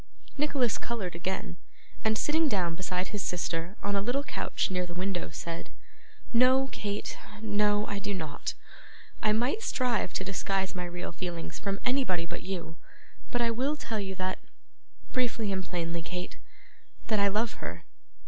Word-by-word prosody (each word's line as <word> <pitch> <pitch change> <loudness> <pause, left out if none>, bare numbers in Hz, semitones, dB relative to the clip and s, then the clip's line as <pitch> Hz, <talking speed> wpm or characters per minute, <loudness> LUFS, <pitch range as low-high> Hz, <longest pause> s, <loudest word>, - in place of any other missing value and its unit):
Nicholas 280 -5 +2
coloured 215 -7 -2
again, 175 0 -2 0.5
and, 220 0 +3
sitting 310 +4 +4
down 180 -7 +2
beside 180 +1 -1
his 205 - -2
sister 175 +1 -1
on 205 0 +1
a 200 - +3
little 245 +7 +1
couch 285 - 0
near 180 -1 +2
the 175 - -6
window, 185 0 -1
said: 165 +2 -4 0.6
'No, 260 +3 +6
Kate, 205 -1 -3 0.2
no, 210 -1 +3
I 200 -1 -2
do 205 +1 -2
not. 160 -7 -2 0.7
I 215 - +4
might 245 - +2
strive 250 - +2
to - - 0
disguise 195 0 0
my 180 -2 -2
real 175 0 -4
feelings 170 -1 -4
from 195 0 -1
anybody 250 -10 +3
but - - -5
you; 175 -4 -4 0.5
but 245 - +1
I 235 -1 +4
will 265 +6 +2
tell 225 -7 -2
you 190 -1 -2
that 185 0 -1 0.7
briefly 235 -5 +1
and 190 -1 0
plainly, 170 -2 -1
Kate 180 +2 -4 0.7
that 215 -2 +3
I 200 - +6
love 215 +3 +1
her. - - -5
200 Hz, 160 wpm, -31 LUFS, 180-235 Hz, 0.7 s, No